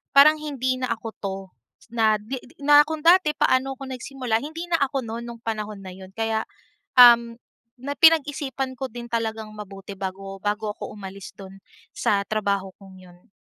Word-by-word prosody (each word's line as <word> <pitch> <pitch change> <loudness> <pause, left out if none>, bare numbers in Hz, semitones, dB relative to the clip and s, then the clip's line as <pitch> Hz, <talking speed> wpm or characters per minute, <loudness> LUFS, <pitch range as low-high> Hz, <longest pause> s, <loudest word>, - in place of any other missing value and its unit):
parang 305 +2 +7
hindi 260 -4 -2
na 255 - -1
ako 225 0 -9
'to, 195 -1 -3 0.5
na 220 -2 +3
'di 255 +5 -5
'di 250 +4 -14
na 295 +1 +7
kung 315 0 -4
dati 335 -1 +5
paano 270 -1 +1
ako 265 0 -9
nagsimula, 255 -2 -2
hindi 320 +7 -6
na 335 - +3
ako 275 -2 0
no'n 230 +1 -6
nung 235 -1 -9
panahon 215 -3 -4
na 185 - -8
yun. 190 +1 -12
Kaya 225 0 -1 0.5
um, 235 -1 +8 0.4
na 275 +3 -4
pinag-isipan 285 -4 +3
ko 265 0 -5
din 240 +1 -8
talagang 220 -2 -3
mabuti 200 -1 -9
bago 195 0 -6
bago 210 +1 -2
ako - - -8
umalis 195 -1 -8
do'n 195 0 -12 0.3
sa 200 -1 +1
trabaho 200 -3 -1
kong 190 -1 -14
yun. 175 0 -20
230 Hz, 175 wpm, -24 LUFS, 205-270 Hz, 0.5 s, um